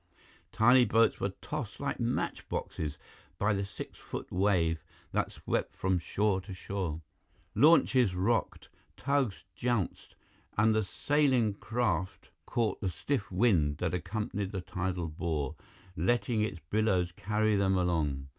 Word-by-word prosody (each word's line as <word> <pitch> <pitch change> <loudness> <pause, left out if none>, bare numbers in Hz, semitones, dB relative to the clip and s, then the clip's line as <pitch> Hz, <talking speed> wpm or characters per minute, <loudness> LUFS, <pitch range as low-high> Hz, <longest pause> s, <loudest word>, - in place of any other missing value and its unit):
Tiny 125 +3 +6
boats 115 -1 +3
were 100 - 0
tossed 150 -8 -5
like 140 0 -2
match 120 +1 -2
boxes 75 -1 -3 0.4
by 105 +1 +2
the 100 0 -1
six 100 - -8
foot - - -7
wave 90 -4 +2 0.3
that - - 0
swept - - -2
from 95 -1 +1
shore 95 +3 0
to 95 0 -8
shore. 90 -4 -3 0.5
Launches 130 - +5
rocked, 110 +6 0 0.3
tugs 140 -7 0
jounced, 120 -7 -2 0.4
and 110 +1 +4
the 110 - +3
sailing 130 0 +2
craft 100 -4 -2 0.2
caught 115 -3 0
the 95 - 0
stiff 105 - -2
wind 90 -8 +3
that 90 0 -1
accompanied 100 +2 -3
the 95 - -3
tidal 90 -1 -3
bore, 75 -3 -2 0.4
letting 115 +6 +1
its 105 -5 -1
billows 95 -5 +2
carry 105 +4 +1
them 95 -1 +2
along. 75 -7 0
100 Hz, 135 wpm, -31 LUFS, 90-115 Hz, 0.5 s, Tiny